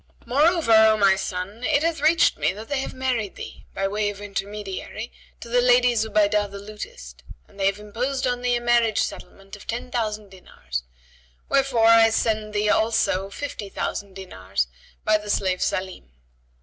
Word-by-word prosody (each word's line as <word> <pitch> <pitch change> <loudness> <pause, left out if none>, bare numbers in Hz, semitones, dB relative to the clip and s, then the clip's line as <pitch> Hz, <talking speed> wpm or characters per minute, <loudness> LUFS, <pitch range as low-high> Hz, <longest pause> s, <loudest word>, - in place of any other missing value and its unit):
Moreover, 310 +1 +2
O 220 0 +7
my 195 -2 +5
son, 190 +4 -5
it 295 +1 +2
hath 330 -2 0
reached 320 +2 +4
me - - +2
that 215 +3 -10
they 285 -2 0
have 270 - -5
married 250 -6 -2
thee, - - -10
by 195 - 0
way 205 +1 -1
of 205 -1 -8
intermediary, 205 +2 -6 0.3
to - - -9
the 245 +1 +2
lady 245 0 +4
Zubaydah 210 -2 +1
the 200 - -8
lutist 200 - -9 0.3
and 200 - -19
they 195 - +3
have 200 0 0
imposed 245 +6 -3
on 245 -1 -1
thee 245 0 +1
a 240 - -2
marriage 240 -2 +2
settlement 195 +1 -8
of 205 - -15
ten 240 +2 -4
thousand 215 -3 -2
dinars; 65 - -7 0.7
wherefore 270 -5 +2
I 225 0 +7
send 215 -1 0
thee 210 0 0
also 210 -3 +1
fifty 210 -3 -6
thousand 195 0 -4
dinars 95 - -3 0.4
by 215 0 +4
the 210 0 -9
slave 185 -2 0
Salнm." 185 - -3
215 Hz, 175 wpm, -24 LUFS, 195-240 Hz, 0.7 s, O